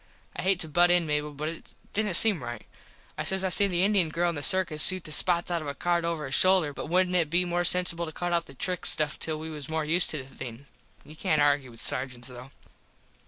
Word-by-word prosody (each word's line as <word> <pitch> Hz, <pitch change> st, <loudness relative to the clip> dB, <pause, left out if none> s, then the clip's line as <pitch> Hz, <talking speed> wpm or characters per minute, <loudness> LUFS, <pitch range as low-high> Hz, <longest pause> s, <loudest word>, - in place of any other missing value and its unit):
I -, -, -5 dB
hate 190 Hz, -1 st, 0 dB
to 160 Hz, -, -2 dB
butt 175 Hz, +3 st, +2 dB
in 175 Hz, -1 st, +2 dB
Mable 150 Hz, 0 st, -3 dB
but 150 Hz, +2 st, -6 dB
it 165 Hz, +1 st, -10 dB, 0.2 s
didnt 210 Hz, -4 st, 0 dB
seem 195 Hz, -, +5 dB
right. 120 Hz, -2 st, -8 dB, 0.5 s
I -, -, -2 dB
says 190 Hz, 0 st, -1 dB
I 190 Hz, -, -1 dB
seen 200 Hz, +2 st, +2 dB
the 175 Hz, 0 st, 0 dB
Indien 195 Hz, -5 st, +1 dB
girl 175 Hz, +2 st, -1 dB
in -, -, -3 dB
the 145 Hz, -, -5 dB
circus 165 Hz, -1 st, +4 dB
shoot 185 Hz, -2 st, +4 dB
the 155 Hz, -, -9 dB
spots 175 Hz, +3 st, 0 dB
out 170 Hz, -1 st, -2 dB
of 155 Hz, -, -8 dB
a 140 Hz, -, -6 dB
card 170 Hz, +3 st, -2 dB
over 165 Hz, -2 st, -4 dB
her 135 Hz, -, -7 dB
shoulder 180 Hz, 0 st, +3 dB
but 145 Hz, -, -8 dB
wouldnt 180 Hz, +1 st, 0 dB
it 165 Hz, -4 st, 0 dB
be 175 Hz, +3 st, +1 dB
more 175 Hz, 0 st, -2 dB
censible 175 Hz, -1 st, +5 dB
to -, -, -7 dB
cut 175 Hz, +2 st, -4 dB
out 170 Hz, -1 st, -1 dB
the 140 Hz, -, -14 dB
trick 180 Hz, +6 st, -2 dB
stuff 155 Hz, -1 st, 0 dB
till 155 Hz, -1 st, -3 dB
we 160 Hz, +1 st, -8 dB
was 150 Hz, -2 st, -8 dB
more 160 Hz, -1 st, -3 dB
used 170 Hz, +3 st, +1 dB
to 155 Hz, -, -3 dB
the 135 Hz, -1 st, -11 dB
thing. 125 Hz, +1 st, -9 dB, 0.4 s
You 155 Hz, -, -14 dB
cant 155 Hz, 0 st, -1 dB
argue 145 Hz, -2 st, +1 dB
with 115 Hz, -1 st, -11 dB
sargents, 130 Hz, -2 st, -2 dB
though. 125 Hz, +1 st, -12 dB
165 Hz, 260 wpm, -26 LUFS, 145-180 Hz, 0.5 s, seem